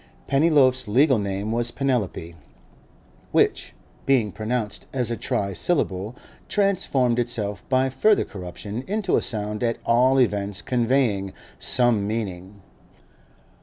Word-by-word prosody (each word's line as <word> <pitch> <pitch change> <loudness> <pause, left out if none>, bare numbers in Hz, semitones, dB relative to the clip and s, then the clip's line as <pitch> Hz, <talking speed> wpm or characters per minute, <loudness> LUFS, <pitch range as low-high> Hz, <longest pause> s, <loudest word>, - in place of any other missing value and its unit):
Pennyloaf's 135 -4 +3
legal 130 +3 +3
name 100 +1 -3
was 120 +1 +2
Penelope, 120 -11 -2 1.0
which, - - +1 0.3
being 125 -7 +3
pronounced 110 0 -3
as 125 -3 -1
a - - 0
trisyllable, 100 - -1 0.3
transformed 170 - +1
itself 105 -5 -2
by 130 0 +3
further 200 +11 +2
corruption 100 +4 -7
into 205 -1 0
a - - +2
sound 105 -1 -3
at 115 -1 0
all 130 +3 +4
events 100 -5 0
conveying 120 -6 0 0.3
some 120 -5 +2
meaning. 100 -3 -5
115 Hz, 110 wpm, -23 LUFS, 105-130 Hz, 1.0 s, all